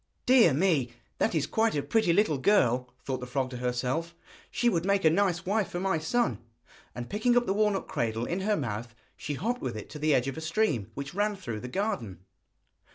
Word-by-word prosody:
'Dear 245 Hz, -9 st, +6 dB
me! 145 Hz, -5 st, +2 dB, 0.3 s
that -, -, +1 dB
is 155 Hz, -, +1 dB
quite 225 Hz, -3 st, +1 dB
a 145 Hz, -, 0 dB
pretty 220 Hz, -6 st, +2 dB
little 165 Hz, -6 st, +2 dB
girl,' 125 Hz, -, +2 dB
thought 130 Hz, -2 st, -2 dB
the 125 Hz, -, -7 dB
frog 130 Hz, 0 st, -2 dB
to 125 Hz, -, -5 dB
herself; 125 Hz, +7 st, -2 dB, 0.3 s
'she 240 Hz, -, 0 dB
would 170 Hz, -8 st, +2 dB
make 200 Hz, -1 st, +1 dB
a 160 Hz, -, +6 dB
nice 180 Hz, -1 st, +1 dB
wife 205 Hz, +1 st, 0 dB
for 175 Hz, -, -4 dB
my 190 Hz, -3 st, 0 dB
son.' 235 Hz, +10 st, 0 dB, 0.6 s
And 120 Hz, 0 st, -5 dB
picking 240 Hz, +4 st, +2 dB
up 245 Hz, -, +3 dB
the 195 Hz, -, 0 dB
walnut 210 Hz, -1 st, +1 dB
cradle 115 Hz, 0 st, -2 dB
in 175 Hz, +7 st, -2 dB
her 205 Hz, +2 st, +1 dB
mouth, 115 Hz, -3 st, -4 dB, 0.2 s
she 145 Hz, -, -4 dB
hopped 240 Hz, -, -2 dB
with 120 Hz, -4 st, -3 dB
it 105 Hz, -, -9 dB
to 150 Hz, -, -7 dB
the 155 Hz, 0 st, +3 dB
edge 125 Hz, +1 st, +1 dB
of 135 Hz, -, -4 dB
a -, -, -5 dB
stream 160 Hz, -, 0 dB
which 140 Hz, +2 st, -6 dB
ran 205 Hz, +2 st, 0 dB
through 120 Hz, -, -5 dB
the 125 Hz, -, -7 dB
garden. 125 Hz, -, -3 dB
160 Hz, 220 wpm, -28 LUFS, 125-205 Hz, 0.6 s, Dear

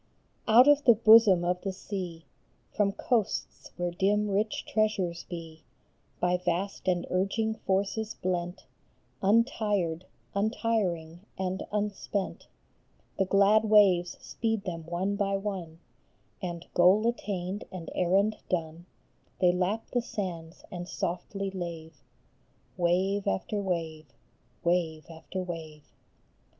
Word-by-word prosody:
UT 240 Hz, +5 st, +7 dB
of 290 Hz, 0 st, +5 dB
the 235 Hz, -, +8 dB
bosom 215 Hz, -5 st, +7 dB
of 180 Hz, +1 st, 0 dB
the 195 Hz, -, -2 dB
sea, 185 Hz, -4 st, -6 dB, 0.5 s
From 205 Hz, -2 st, +2 dB
coasts 220 Hz, +1 st, -1 dB
where 175 Hz, -1 st, -1 dB
dim, 205 Hz, +4 st, +1 dB
rich 210 Hz, +2 st, -1 dB
treasures 195 Hz, -6 st, 0 dB
be, 165 Hz, -2 st, -8 dB, 0.6 s
By 180 Hz, 0 st, +2 dB
vast 180 Hz, +2 st, -2 dB
and 175 Hz, -1 st, +1 dB
urging 200 Hz, +4 st, 0 dB
forces 205 Hz, +2 st, -1 dB
blent, 180 Hz, 0 st, -3 dB, 0.6 s
Untired, 200 Hz, -5 st, +1 dB, 0.3 s
untiring, 200 Hz, -6 st, -1 dB, 0.2 s
and 190 Hz, 0 st, -2 dB
unspent, 205 Hz, -1 st, -3 dB, 0.7 s
The 195 Hz, -, +3 dB
glad 200 Hz, +3 st, +4 dB
waves 195 Hz, -5 st, +4 dB
speed 225 Hz, -3 st, -2 dB
them 165 Hz, -3 st, -5 dB
one 185 Hz, +4 st, -1 dB
by 195 Hz, -1 st, +1 dB
one; 190 Hz, -5 st, -5 dB, 0.6 s
And, 175 Hz, -2 st, -5 dB
goal 185 Hz, +5 st, +5 dB
attained 200 Hz, -4 st, -3 dB
and 175 Hz, -3 st, -7 dB
errand 195 Hz, +4 st, +2 dB
done, 165 Hz, 0 st, -3 dB, 0.5 s
They 180 Hz, -1 st, +5 dB
lap 185 Hz, +5 st, -1 dB
the 245 Hz, -, +1 dB
sands 180 Hz, -7 st, -6 dB
and 175 Hz, 0 st, -6 dB
softly 195 Hz, +3 st, -3 dB
lave, 165 Hz, -5 st, -7 dB, 0.7 s
Wave 185 Hz, +3 st, +1 dB
after 200 Hz, -, -1 dB
wave, 165 Hz, -5 st, -3 dB, 0.6 s
wave 170 Hz, -3 st, 0 dB
after 175 Hz, +3 st, -6 dB
wave. 160 Hz, -4 st, -7 dB
185 Hz, 115 wpm, -29 LUFS, 175-205 Hz, 0.7 s, the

